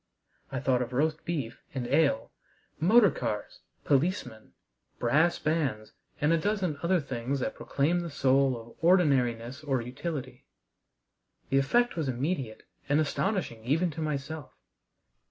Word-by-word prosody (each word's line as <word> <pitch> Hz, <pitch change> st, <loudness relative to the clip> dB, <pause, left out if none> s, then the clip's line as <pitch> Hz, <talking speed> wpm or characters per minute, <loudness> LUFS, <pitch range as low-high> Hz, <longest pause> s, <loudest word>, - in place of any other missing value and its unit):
I -, -, -2 dB
thought 125 Hz, -2 st, +1 dB
of 125 Hz, 0 st, -4 dB
roast 155 Hz, +4 st, 0 dB
beef 140 Hz, -9 st, -3 dB
and 130 Hz, -2 st, -2 dB
ale, 140 Hz, -2 st, +2 dB, 0.5 s
motor 205 Hz, +4 st, +6 dB
cars, 105 Hz, -1 st, -4 dB, 0.2 s
policemen, 135 Hz, -, 0 dB, 0.4 s
brass 155 Hz, +8 st, +3 dB
bands, 140 Hz, -9 st, -1 dB, 0.3 s
and 150 Hz, +3 st, +3 dB
a 165 Hz, -, +3 dB
dozen 185 Hz, -5 st, -1 dB
other 175 Hz, +1 st, +2 dB
things 135 Hz, -1 st, -3 dB
that -, -, -2 dB
proclaimed 165 Hz, +6 st, 0 dB
the 170 Hz, -, -5 dB
soul 135 Hz, -3 st, +2 dB
of 115 Hz, +5 st, -15 dB
ordinariness 135 Hz, -7 st, +2 dB
or 135 Hz, -3 st, 0 dB
utility. 130 Hz, +1 st, -6 dB, 1.0 s
The 135 Hz, -, +5 dB
effect 240 Hz, -, +2 dB
was 155 Hz, -5 st, -1 dB
immediate 130 Hz, -3 st, -2 dB, 0.3 s
and 145 Hz, +2 st, +4 dB
astonishing 155 Hz, -, -1 dB
even 160 Hz, +8 st, +1 dB
to 160 Hz, -, -6 dB
myself. 150 Hz, 0 st, -4 dB
140 Hz, 135 wpm, -29 LUFS, 125-165 Hz, 1.0 s, motor